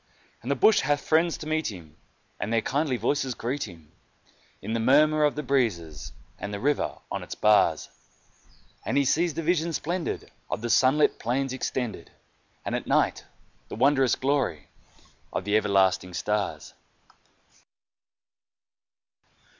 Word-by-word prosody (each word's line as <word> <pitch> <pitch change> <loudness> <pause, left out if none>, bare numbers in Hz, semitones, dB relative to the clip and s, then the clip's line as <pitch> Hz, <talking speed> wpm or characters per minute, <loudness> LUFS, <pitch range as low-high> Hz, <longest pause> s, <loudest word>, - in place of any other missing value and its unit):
And 120 - -7
the 140 - +2
bush 215 - +5
has 145 -1 +1
friends 160 +3 +2
to - - -8
meet 155 -4 -1
him, 85 -6 -12 0.4
and 105 - -3
their 115 -1 +1
kindly 140 -2 0
voices 130 +2 -1
greet 125 +2 -3
him 80 -5 -15 0.7
In 110 - -5
the 115 - 0
murmur 150 +6 +4
of 150 - +2
the 150 - -3
breezes 95 - -1 0.3
and 105 - -5
the 100 - -4
river 145 +5 0
on - - -3
its - - -7
bars, 105 0 +3 1.0
And - - -1
he 140 - +3
sees 165 +3 +1
the 165 - -3
vision 170 0 +1
splendid 170 +3 -3 0.2
of - - -3
the 120 0 -2
sunlit 135 +4 +3
plain 130 +2 -1
extended, 125 -8 -4 0.6
And - - -3
at - - -3
night - - +1 0.4
the - - -7
wondrous 135 +2 +3
glory 130 - -1 0.6
of - - -3
the 105 +1 +1
everlasting 95 -4 +2
stars. 100 -8 -2
130 Hz, 145 wpm, -26 LUFS, 105-150 Hz, 1.0 s, bush